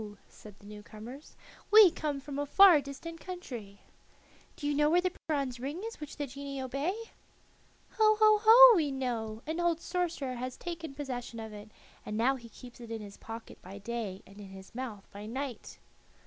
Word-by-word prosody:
said 210 -2 -14
the 205 - -19
new 210 0 -10
comers. 230 +8 -11 0.3
"We 420 -4 +9
come 295 -3 -3
from 280 0 -6
a 290 - -2
far 360 -1 +7
distant 330 +4 -8
country." 245 - -8 0.7
"Do 320 - -8
you 290 - +1
know 295 +1 +3
where 345 +3 +4
the 360 0 -1
bronze 275 -5 -1
ring 290 - -5
is 455 +1 -7
which 300 -1 -8
the 290 - -2
genii 275 +1 -7
obey?" 275 +8 -2 1.0
"Ho, 430 -1 +5
ho, 430 -1 +6
ho! 475 +2 +10
we 310 -5 +1
know; 230 -4 -3
an 320 +2 -3
old 345 -2 +1
sorcerer 340 -7 -2
has 255 +1 -5
taken 330 -5 -6
possession 245 -5 -5
of 220 -1 -7
it, 210 +1 -10 0.3
and 210 - -5
now 255 +4 +3
he 235 -3 -11
keeps 245 +1 -13
it 235 - -10
in 225 -1 -4
his 200 -1 -11
pocket 225 0 -10
by 190 +2 -10
day 205 -2 -5
and 195 +2 -15
in 195 - -10
his 190 0 -12
mouth 230 -5 -6
by 205 +1 -9
night." 260 0 -6
270 Hz, 190 wpm, -31 LUFS, 225-330 Hz, 1.0 s, ho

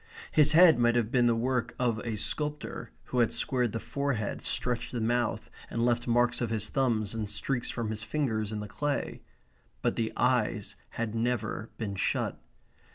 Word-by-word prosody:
His 150 0 +5
head 165 -5 +7
might 120 0 +4
have 115 -2 +1
been 120 -2 +4
the 115 - +3
work 120 0 -1
of 120 -3 +1
a 115 -1 -3
sculptor, 150 +8 -3
who 125 - -2
had 120 - +3
squared 125 -4 0
the 115 - -3
forehead, 140 -7 -2
stretched 125 -1 +1
the 120 - -3
mouth, 115 -1 0 0.2
and 115 0 0
left 120 0 +1
marks 120 +1 +2
of 120 - 0
his 110 -1 0
thumbs 115 -6 +1
and 110 -2 -3
streaks 120 +4 -2
from 115 -2 -3
his 105 -1 -3
fingers 110 -5 -1
in 105 -1 -3
the 105 - -6
clay. 145 +7 -2 0.6
But - - +1
the 115 -1 0
eyes 120 -4 +1
had 115 -2 -3
never 115 -1 -1
been 105 -4 -3
shut. 95 - -1
120 Hz, 180 wpm, -29 LUFS, 110-125 Hz, 0.6 s, head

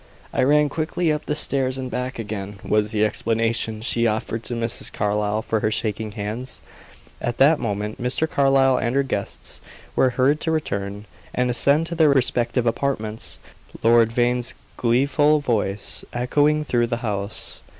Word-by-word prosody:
"I - - +1
ran 150 +3 +4
quickly 160 +2 -1
up 150 0 -3
the 150 - 0
stairs 135 -3 -1
and 130 -1 -5
back 125 +1 -3
again," 105 -3 -5
was 105 0 +1
the 110 -1 +2
explanation 115 0 -1
she 115 -1 +1
offered 110 +1 -2
to 120 - -3
Mrs. 115 0 -3
Carlyle 105 +1 0
for 110 - 0
her 105 - +1
shaking 110 -1 -2
hands. 110 +4 -5 0.6
At 120 - -2
that 150 +4 +5
moment 105 -1 -3
Mr. 125 +6 +1
Carlyle 135 -3 +3
and 120 +1 -1
their 140 - +3
guests 105 -7 -5 0.3
were 130 - +4
heard 140 +4 +3
to - - -1
return, 100 -10 -2 0.3
and 125 0 +1
ascend 140 +6 +2
to 170 - -5
their 160 -2 +4
respective 125 -2 +2
apartments, 115 -3 -2 0.5
Lord 115 0 +5
Vane's 120 0 0 0.2
gleeful 140 +5 +3
voice 105 -7 -1
echoing 145 +5 +2
through 120 -5 +1
the 120 0 -1
house. 100 -1 -1
120 Hz, 160 wpm, -23 LUFS, 110-135 Hz, 0.6 s, that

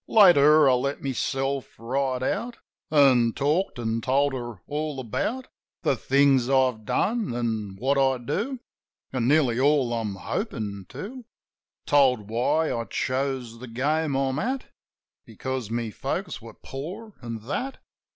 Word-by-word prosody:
Later, 155 -7 +7
I 130 - +5
let 140 +3 -1
myself 135 0 -2
right 130 +2 -1
out, 230 - -2 0.3
An' 130 -6 +5
talked; 150 +6 0
an' 115 -1 -1
told 135 +3 +2
her 120 -5 -5
all 150 -1 -3
about 220 - -2 0.4
The - - +2
things 135 -2 +3
I've 130 -5 +2
done, 215 - 0
an' 110 -5 -2
what 135 +6 +1
I 135 -1 +3
do. 220 - -3 0.5
An' 125 -3 0
nearly 135 -5 +3
all 135 -3 +3
I'm 110 -4 -2
hopin' 100 - -4
to. 245 +6 -7 0.6
Told 125 -7 +3
why 150 +7 +1
I 115 0 -3
chose 130 -3 -2
the 130 - -8
game 145 +5 0
I'm 135 +1 0
at 255 +4 -3 0.5
Because 130 -4 -5
my 115 -1 -2
folks - - -4
were - - -11
poor, 185 +11 -8
an' 115 -2 -5
that. 255 - -3
135 Hz, 140 wpm, -26 LUFS, 120-150 Hz, 0.6 s, Later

